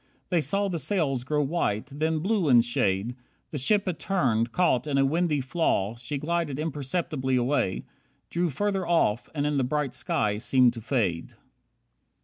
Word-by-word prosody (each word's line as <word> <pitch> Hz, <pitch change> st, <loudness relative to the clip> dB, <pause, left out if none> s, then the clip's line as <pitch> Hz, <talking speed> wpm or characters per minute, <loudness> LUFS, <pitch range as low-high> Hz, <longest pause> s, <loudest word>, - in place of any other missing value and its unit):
They 175 Hz, -3 st, +2 dB
saw 200 Hz, +5 st, 0 dB
the 175 Hz, -4 st, -2 dB
sails 140 Hz, -7 st, 0 dB
grow 150 Hz, +3 st, 0 dB
white, 135 Hz, -8 st, -1 dB
then 155 Hz, +2 st, -1 dB
blue 195 Hz, -3 st, +1 dB
in 120 Hz, -2 st, +7 dB
shade, 115 Hz, -1 st, 0 dB, 0.4 s
The 150 Hz, -, -3 dB
ship 205 Hz, +9 st, +2 dB
had 180 Hz, -4 st, -3 dB
turned, 120 Hz, -, +1 dB
caught 155 Hz, -7 st, +1 dB
in 140 Hz, -2 st, 0 dB
a 135 Hz, -, +4 dB
windy 155 Hz, 0 st, +1 dB
flaw 125 Hz, -, 0 dB
She 125 Hz, +5 st, -4 dB
glided 155 Hz, -1 st, -2 dB
imperceptibly 145 Hz, -2 st, -2 dB
away, 125 Hz, -6 st, 0 dB, 0.5 s
Drew 175 Hz, 0 st, 0 dB
farther 195 Hz, +4 st, -1 dB
off 120 Hz, -10 st, +1 dB
and 145 Hz, -1 st, 0 dB
in 150 Hz, -1 st, 0 dB
the 135 Hz, -, +2 dB
bright 140 Hz, 0 st, -1 dB
sky 125 Hz, -8 st, -1 dB
seemed 125 Hz, 0 st, +4 dB
to 115 Hz, -, -8 dB
fade. 105 Hz, -9 st, -1 dB
145 Hz, 165 wpm, -26 LUFS, 125-170 Hz, 0.5 s, in